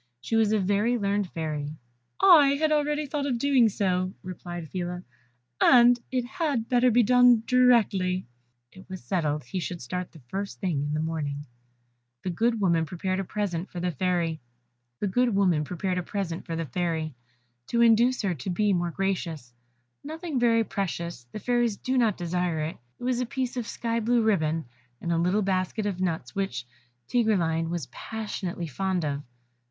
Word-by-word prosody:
She 225 - -3
was 220 -2 +3
a 220 - +3
very 205 +5 +1
learned 200 -2 0
Fairy. 155 -3 -4 0.4
"I 295 -7 +7
had 310 0 +2
already 300 0 +1
thought 285 0 -2
of 250 -4 0
doing 255 -3 +4
so," 185 -2 -1
replied 175 -2 -7
Phila, 180 +1 -4 0.6
"and 245 -1 +7
it 250 -2 -1
had 265 -4 -1
better 250 0 +4
be 240 +1 +4
done 245 0 +5
directly." 215 -8 +3 0.5
It 190 +1 -15
was 185 -1 -7
settled 150 -5 -1
he 155 +10 -4
should 175 0 -4
start 180 +8 -5
the 160 - -15
first 195 +6 -5
thing 175 -8 -1
in 145 +1 -2
the - - -1
morning. 150 -3 -3 0.8
The 185 - -2
good 230 +6 +1
woman 170 -5 +2
prepared 185 +3 -2
a - - -1
present 195 -3 -3
for 180 - -6
the 180 +1 -1
Fairy, 170 -1 -1 0.6
to 205 - 0 2.7
induce 235 +2 +4
her 190 -3 +1
to 155 +3 -6
be 205 +3 +2
more 175 -1 0
gracious 165 -9 -3 0.5
nothing 315 -1 -4
very 230 -1 +4
precious, 170 - -4
the - - -6
Fairies 240 -2 +1
do 260 - -2
not 230 -6 +2
desire 175 -1 -1
it 155 +2 -4 0.2
it - - -12
was 250 -1 0
a 250 - 0
piece 255 0 -3
of 240 -3 -3
sky 230 0 -2
blue 235 +1 +2
ribbon, 165 -7 +1 0.3
and 170 - -3
a 165 - +2
little 185 +5 +2
basket 190 +3 -1
of 190 -3 -2
nuts, 170 -3 -2
which 190 - -3 0.4
Tigreline 170 -9 +1
was 170 -5 -3
passionately 205 -6 -5
fond 180 +3 -1
of. 140 -1 -2
195 Hz, 160 wpm, -27 LUFS, 170-235 Hz, 2.7 s, I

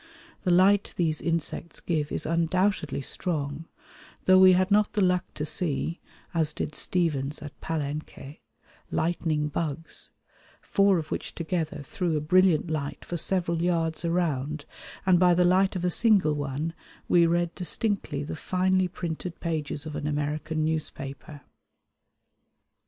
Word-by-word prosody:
The 180 - +3
light 190 +3 +4
these 160 -3 +1
insects 165 0 -2
give 155 -4 -1
is - - -1
undoubtedly 165 -1 +1
strong, 145 0 -3 0.6
though 185 0 +7
we 185 0 +8
had 185 +2 +2
not 210 +1 +3
the 210 - +1
luck 180 -1 +1
to 150 - -3
see, 160 +1 -1 0.3
as 160 -2 +1
did - - -4
Stephens 150 -5 0
at 150 - -10
Palenque, 150 -2 -5 0.5
"'lightning 160 -2 0
bugs,' 160 +1 -3 0.5
four 200 -2 +3
of 155 -2 -5
which - - -4
together 160 -3 -3
threw 180 -4 -1
a - - +1
brilliant 170 +1 +3
light 145 -2 -4
for 175 - -4
several 170 -1 0
yards 165 -2 0
around, 155 -4 -1 0.4
and 185 -2 +5
by 180 -1 +5
the 180 +1 +4
light 190 +2 +3
of 180 -1 -2
a 180 - +2
single 200 -8 +4
one 145 +2 -3 0.3
we 170 -1 +5
read 170 0 +1
distinctly 180 -6 -2
the 145 - -5
finely 185 +3 +1
printed 170 0 -5
pages 155 -3 -3
of 155 -1 -6
an 145 - -3
American 150 +1 -1
newspaper." 150 -2 -4
165 Hz, 140 wpm, -27 LUFS, 150-180 Hz, 0.6 s, we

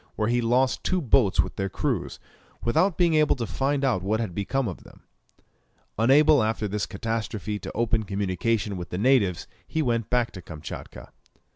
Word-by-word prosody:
where 110 0 0
he 120 0 +2
lost 125 +3 +1
two 185 - +1
boats 120 - +2
with - - -6
their 95 0 -1
crews, - - -2 0.4
without 160 +10 +2
being 175 -2 +3
able 155 -1 +4
to 120 -3 -3
find 135 +5 -1
out 120 -9 +1
what 105 +3 0
had 110 -6 -3
become 120 +7 -1
of 90 - -7
them. - - -17 1.0
Unable 140 +4 +5
after 110 0 -1
this 105 +1 -2
catastrophe 110 -1 -3
to - - -7
open 115 -1 +1
communication 100 +1 -1
with 90 - -6
the 90 - -4
natives, 105 -6 +2 0.2
he 160 - -1
went 115 -4 -1
back 125 -2 +1
to 95 - -9
Kamtchatka. 80 -2 -9
115 Hz, 175 wpm, -25 LUFS, 100-135 Hz, 1.0 s, Unable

